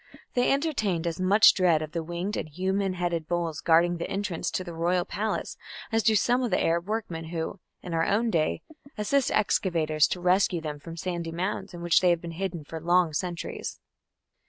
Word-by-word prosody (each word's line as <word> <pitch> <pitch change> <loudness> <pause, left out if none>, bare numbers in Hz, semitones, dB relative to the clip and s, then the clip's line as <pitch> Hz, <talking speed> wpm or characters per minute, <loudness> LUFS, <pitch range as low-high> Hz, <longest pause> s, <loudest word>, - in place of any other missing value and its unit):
They 245 0 +2
entertained 220 - 0
as 170 +1 -2
much 200 +4 +6
dread 170 -5 +3
of 155 - -7
the 170 - -2
winged 175 +5 -4
and - - -4
human 190 +4 -1
headed 175 -3 -2
bulls 170 -3 -2
guarding 170 +1 +4
the 170 - -4
entrance 195 -4 -2
to 185 - -2
the 175 -2 -8
royal 175 +2 +1
palace 215 +2 -3 0.3
as 225 0 +2
do 220 0 +3
some 245 +5 +3
of 245 - 0
the 185 - +1
Arab 170 +2 +1
workmen 205 -7 -3
who, 165 +3 -4 0.2
in 175 - -6
our 165 0 +2
own 225 +3 +1
day, 155 -5 0 0.3
assist 250 +6 +1
excavators 160 -7 +2
to 180 - -3
rescue 180 0 +2
them 150 -2 -5
from 165 +3 -9
sandy 170 -1 -3
mounds 180 +2 -3
in 170 - -8
which 175 -1 +4
they 180 - +4
have 170 -1 +3
been 170 - -6
hidden 175 -2 -4
for 160 +2 -7
long 175 -1 +3
centuries. 175 +2 -4
175 Hz, 200 wpm, -27 LUFS, 165-195 Hz, 0.3 s, much